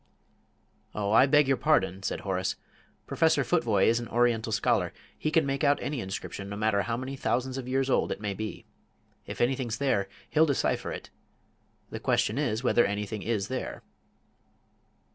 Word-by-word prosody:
"Oh, 100 -1 -1
I 130 +5 +6
beg 145 0 +4
your 135 -1 +2
pardon," 95 - +2
said - - -3
Horace; 95 -1 -1 0.5
"Professor - - +2
Futvoye - - +2
is 115 +1 +3
an 120 - -6
Oriental 120 -1 +1
scholar; - - +1 0.2
he 155 - -2
can 155 -1 +3
make 135 +2 -2
out 145 0 +4
any 145 -2 -3
inscription, 100 0 -5
no 100 - -5
matter 105 -1 +1
how 115 +4 -2
many 130 +2 -5
thousands 130 -1 -1
of 125 - -7
years 135 +1 0
old 135 - +1
it - - -3
may 105 -1 -3
be. 110 +2 -6 0.6
If - - -5
anything's 120 -2 0
there, 100 -9 0 0.2
he'll 160 +1 +4
decipher 140 - 0
it. - - -8 0.8
The - - -5
question 110 +6 +1
is 120 -5 -1
whether 120 -1 +4
anything 105 +1 -3
is 100 -1 -1
there." 130 +1 -5
120 Hz, 170 wpm, -28 LUFS, 105-135 Hz, 0.8 s, I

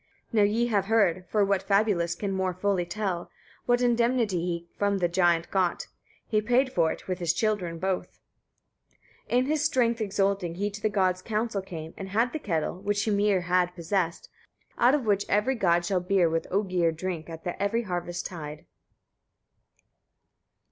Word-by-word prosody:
38. 220 -3 +3
Now - - +6
ye 240 - +3
have 205 -5 +1
heard, 190 -5 +2
for 210 -2 +3
what 195 -1 +1
fabulist 195 -4 +1
can 200 -2 -2
more 190 -1 -1
fully 185 -1 0
tell 190 -4 -3 0.4
what 245 0 +3
indemnity 235 -4 +2
he 170 0 -3
from 200 -1 +1
the 180 -2 +1
giant 175 -1 +2
got: 185 -3 0 0.4
he 215 -2 +1
paid 250 +4 +2
for 165 -2 +2
it - - -8
with 185 -1 -2
his 170 -1 +1
children 185 -5 -1
both. 185 +1 -3 1.1
39. 245 - +3
In 255 - +1
his 300 +1 0
strength 235 -6 +2
exulting 195 -4 0
he 205 +3 -2
to 210 +1 -8
the 215 - +1
gods' 185 -3 +1
council 215 -1 -2
came, 165 -4 -8
and 195 -1 -6
had 230 +5 +1
the 315 - -2
kettle, 175 - -2
which 205 0 0
Hymir 205 -3 +2
had 180 0 +1
possessed, 170 0 -2 0.5
out 250 +4 +5
of 275 -5 -2
which 205 -1 +1
every 210 +6 +2
god 175 -7 +2
shall 185 0 +1
beer 180 -1 +3
with 165 0 -1
Oegir 185 -4 +1
drink 170 0 -5
at 165 -1 -9
every 215 +4 0
harvest 175 -3 -4
tide. 155 -4 -7
195 Hz, 175 wpm, -27 LUFS, 175-215 Hz, 1.1 s, Now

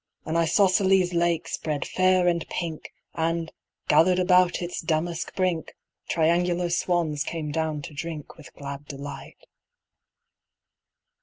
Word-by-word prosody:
An 160 - -3
isosceles 185 +2 +3
lake 170 -1 +1
spread 150 -3 -3
fair 185 -1 +3
and 170 -2 +2
pink, 165 -3 -4 0.2
And, 165 0 -1 0.4
gathered 165 +4 +5
about 180 -1 +4
its 175 0 -4
damask 165 +1 -2
brink, 180 -4 -1 0.3
Triangular 175 +1 +1
swans 170 -4 0
came 155 -3 -4
down 155 -1 -2
to 150 - -8
drink 155 0 -6
With 155 - -14
glad 140 0 -7
delight. 140 0 -9
170 Hz, 120 wpm, -25 LUFS, 155-180 Hz, 0.4 s, gathered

